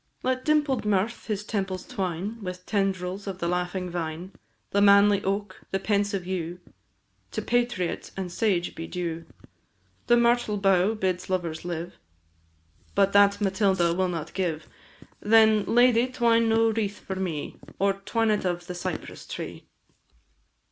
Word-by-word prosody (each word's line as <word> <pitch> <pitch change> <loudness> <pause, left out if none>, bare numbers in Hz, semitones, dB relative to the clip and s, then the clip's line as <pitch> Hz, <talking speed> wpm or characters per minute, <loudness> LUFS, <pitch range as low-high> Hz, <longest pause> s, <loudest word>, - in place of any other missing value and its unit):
Let 255 0 0
dimpled 295 -4 +2
mirth 210 +2 0
his 210 -2 -2
temples 195 -3 -3
twine 195 0 -4
With 180 -1 -6
tendrils 195 -1 -1
of 190 -2 -4
the 170 - -2
laughing 180 +1 -2
vine; 170 +1 -4 0.4
The 200 - +2
manly 200 0 +6
oak, 195 0 -3
the 195 - 0
pensive 200 -1 0
yew, 180 -1 -4 0.7
To - - -3
patriot 240 -8 -1
and 185 -2 -4
to - - -10
sage 190 -6 +1
be 165 - -7
due; 170 -2 -4 0.8
The 240 - +5
myrtle 235 -3 +2
bough 195 +1 +3
bids 185 -3 -2
lovers 170 -4 -2
live 175 0 -5 1.0
But 200 0 +3
that 200 0 +5
Matilda 190 -3 +2
will 185 +1 0
not 165 -3 -5
give; 170 -5 -2 0.5
Then, 220 -1 +5
lady, 245 0 +4
twine 230 -2 +2
no 225 0 +3
wreath 205 -2 -2
for 190 - -6
me, 175 -6 -4 0.2
Or 195 0 +2
twine 220 +3 0
it 210 - 0
of 175 -1 -2
the 180 - -6
cypress 175 - -6
tree! - - -7
195 Hz, 150 wpm, -26 LUFS, 180-215 Hz, 1.0 s, manly